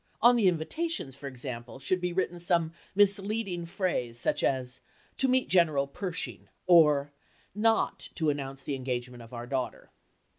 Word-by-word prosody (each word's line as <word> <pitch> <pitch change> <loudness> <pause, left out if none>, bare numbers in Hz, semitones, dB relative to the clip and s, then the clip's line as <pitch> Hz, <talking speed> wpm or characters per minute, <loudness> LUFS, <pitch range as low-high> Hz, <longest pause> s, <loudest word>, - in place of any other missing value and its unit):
On 240 +2 +6
the 220 -5 +4
invitations, 180 - -1
for 140 0 -8
example, 125 -2 -6
should 180 +7 0
be 180 0 -1
written 175 -1 -1
some 170 -2 +1 0.2
misleading 200 -3 +2
phrase, 125 - -2
such - - +1
as 125 -2 -1 0.4
"To 265 - +3
meet 255 0 +2
General 155 -6 +3
Pershing" 170 +4 -4 0.2
or 150 -5 +5 0.4
"Not 225 +2 +1
to 160 -3 +1
Announce 135 -1 -6
the 145 - -3
Engagement 125 -2 -4
of 115 - -13
our 120 -1 -6
Daughter." 130 0 -4
160 Hz, 150 wpm, -29 LUFS, 130-190 Hz, 0.4 s, On